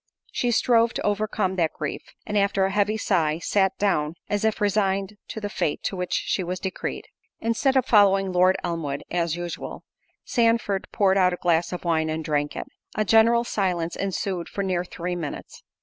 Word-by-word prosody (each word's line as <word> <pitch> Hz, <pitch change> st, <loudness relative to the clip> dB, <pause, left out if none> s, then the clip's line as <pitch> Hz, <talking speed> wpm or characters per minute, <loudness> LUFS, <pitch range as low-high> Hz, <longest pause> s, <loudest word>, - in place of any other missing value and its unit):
She 245 Hz, -, 0 dB
strove 230 Hz, 0 st, +3 dB
to -, -, -2 dB
overcome 205 Hz, -2 st, 0 dB
that 165 Hz, -3 st, +1 dB
grief, 150 Hz, -, -4 dB, 0.2 s
and 210 Hz, -, -4 dB
after 200 Hz, -1 st, +2 dB
a 195 Hz, -, -1 dB
heavy 210 Hz, +2 st, +1 dB
sigh, 160 Hz, -8 st, +1 dB
sat 190 Hz, +2 st, +1 dB
down, 160 Hz, -6 st, +1 dB, 0.2 s
as 205 Hz, 0 st, 0 dB
if 220 Hz, -1 st, +1 dB
resigned 200 Hz, -1 st, +1 dB
to -, -, -6 dB
the 205 Hz, -, -3 dB
fate 160 Hz, -6 st, -2 dB
to -, -, -2 dB
which 180 Hz, -1 st, -3 dB
she 190 Hz, -, 0 dB
was 180 Hz, +1 st, -3 dB
decreed. 190 Hz, 0 st, -4 dB, 0.3 s
Instead 250 Hz, +4 st, +1 dB
of 255 Hz, -, +3 dB
following 195 Hz, -4 st, +4 dB
Lord 185 Hz, +1 st, +4 dB
Elmwood, 165 Hz, -5 st, -3 dB
as 170 Hz, -2 st, 0 dB
usual, 175 Hz, -1 st, -6 dB, 0.4 s
Sandford 230 Hz, -4 st, +1 dB
poured 195 Hz, -1 st, +3 dB
out 180 Hz, -1 st, +4 dB
a 180 Hz, -, -7 dB
glass 170 Hz, -1 st, +2 dB
of 180 Hz, -, -5 dB
wine, 160 Hz, -2 st, +1 dB
and 160 Hz, 0 st, -3 dB
drank 145 Hz, -1 st, -1 dB
it. -, -, -4 dB, 0.3 s
A 215 Hz, -, +1 dB
general 230 Hz, +2 st, +5 dB
silence 180 Hz, -7 st, -1 dB
ensued 190 Hz, -2 st, -3 dB
for 200 Hz, -, -3 dB
near 180 Hz, -2 st, 0 dB
three 180 Hz, 0 st, -4 dB
minutes. 160 Hz, -5 st, -6 dB
190 Hz, 185 wpm, -25 LUFS, 175-210 Hz, 0.4 s, general